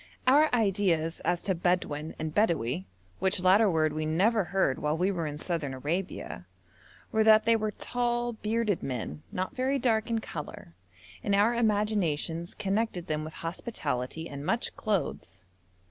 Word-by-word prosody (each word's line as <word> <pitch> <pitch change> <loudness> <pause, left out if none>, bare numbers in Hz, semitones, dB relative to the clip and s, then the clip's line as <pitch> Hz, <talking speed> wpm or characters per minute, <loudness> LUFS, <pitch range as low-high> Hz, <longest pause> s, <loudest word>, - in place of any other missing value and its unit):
Our 290 +4 +5
ideas 190 -8 +1
as 175 0 -1
to 190 - +2
Bedouin 165 -3 -1
and 155 -1 -4
Bedawi, 140 - +1 0.3
which 190 0 +1
latter 195 +4 +5
word 155 -3 +2
we 155 0 -2
never 200 +6 +2
heard 185 -8 +1
while 150 +1 0
we 185 +4 +2
were 170 -4 -2
in 145 0 -5
Southern 155 -5 -3
Arabia, 170 +8 -4 0.6
were 220 -2 +3
that 215 0 +6
they 230 0 +5
were 215 -1 0
tall, 240 +2 -1
bearded 220 -2 -1
men, 115 - -4
not 185 0 -3
very 265 +2 +1
dark 230 -3 +1
in 230 - +1
colour, 150 - -7 0.5
and 200 - +2
our 210 +4 +4
imaginations 205 -7 0
connected 200 -3 -1
them 155 0 -2
with 155 +1 -7
hospitality 160 - -3
and 140 -2 -7
much 230 +9 0
clothes. 165 - -3
185 Hz, 155 wpm, -29 LUFS, 155-220 Hz, 0.6 s, that